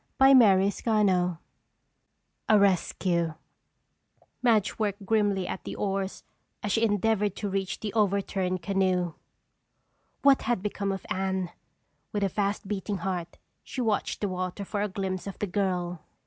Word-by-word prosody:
CHAPTER 255 -8 +7
II 195 -3 +2 1.1
A 215 - +7
Rescue 180 -4 +1 1.1
Madge 225 -6 +2
worked 205 -2 -2
grimly 205 -3 +1
at - - -5
the - - -6
oars 195 -1 -2 0.4
as 205 - -1
she 225 +3 +2
endeavored 210 -1 +1
to 205 - -3
reach 195 -1 -2
the 210 -2 -4
overturned 195 -4 0
canoe. 185 -2 +1 1.1
What 275 -1 +6
had 230 -5 -1
become 200 -1 -2
of 195 -1 -5
Anne? 190 -1 -1 0.6
With 205 -1 0
a 195 - +2
fast 200 +1 -1
beating 200 0 -2
heart, 175 -3 -3 0.3
she - - -7
watched 220 -4 0
the 205 - +1
water 185 +1 -3
for 205 +1 -2
a 210 - +1
glimpse 190 -1 -3
of 195 - -6
the - - -1
girl. 180 -3 -1
195 Hz, 140 wpm, -28 LUFS, 185-210 Hz, 1.1 s, CHAPTER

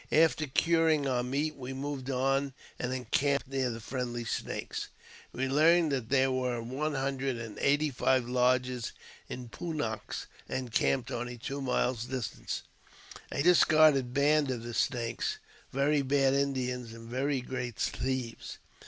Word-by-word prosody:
] - - -27
After 155 -1 +4
curing 160 +1 +3
our 125 -2 +1
meat, 145 +5 -1
we 130 0 -6
moved 135 -1 -4
on 135 +1 +1 0.3
and 125 - -2
encamped 135 +3 0
near 135 -1 0
the| 115 -1 -5
friendly 120 0 -4
Snakes. - - -3 0.4
We 135 +1 -1
learned 160 +3 +4
that 130 -5 -2
there 135 -1 +3
were 125 -2 0
one 135 +6 -2
hundred 135 -1 -1
and] 115 -2 -7
eighty 145 +1 +2
five 130 -1 +2
lodges 125 -1 +1 0.4
of 125 -2 -7
Pun 170 -2 -4
naks 110 -6 -3 0.2
encamped 130 0 0
only 120 +1 -4
two 140 +4 -5
miles 125 -2 0
dis 125 -3 -2
j - - -16
tant, - - -4 0.7
a 140 - 0
discarded 155 -6 +5
band 145 +2 +3
of 120 -3 -2
the 120 0 -6
Snakes, 120 -1 -1 0.3
very 140 +2 +2
bad 135 0 +3
Indians, 125 -4 -1
and] 115 0 -10
very 135 +3 0
great 125 -2 -4
thieves. 130 -1 -3
130 Hz, 155 wpm, -30 LUFS, 125-140 Hz, 0.7 s, discarded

